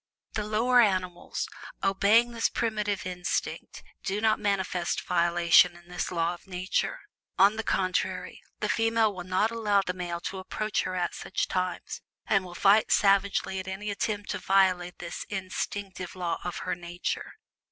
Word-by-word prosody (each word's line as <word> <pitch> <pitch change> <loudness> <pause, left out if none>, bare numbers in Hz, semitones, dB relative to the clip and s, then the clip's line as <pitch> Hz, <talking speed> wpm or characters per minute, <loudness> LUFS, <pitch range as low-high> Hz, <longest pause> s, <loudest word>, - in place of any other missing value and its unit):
The 210 - -2
lower 240 +4 +4
animals, 185 -4 -1 0.4
obeying 205 +5 +4
this 230 -1 +1
primitive 210 -3 -1
instinct, 180 0 -3 0.2
do 195 +2 -1
not 220 0 +2
manifest 190 -3 0
violation 170 0 +4
of 175 - -17
this 180 0 -3
law 170 -1 0
of 175 - -13
Nature. 185 - -1 0.4
On 200 +3 +6
the 220 - -2
contrary, 185 -4 -1 0.2
the - - +1
female 225 -2 +2
will 180 -2 -6
not 185 +5 +1
allow 210 -3 +2
the 180 - -1
male 175 -2 -4
to 190 - -4
approach 210 +2 -2
her 185 - -3
at 180 -1 -1
such - - -2
times, 185 -1 -3 0.2
and 195 -2 +2
will 175 -1 -10
fight 200 +5 +4
savagely 195 -1 +3
at 190 - -6
any 200 +2 -4
attempt 205 0 -2
to 205 - -3
violate 185 -2 +2
this 170 -1 -6
instinctive 190 -1 -4
law 175 -2 -2
of 175 - -4
her 185 - 0
nature. 175 0 -4
190 Hz, 160 wpm, -28 LUFS, 180-210 Hz, 0.4 s, On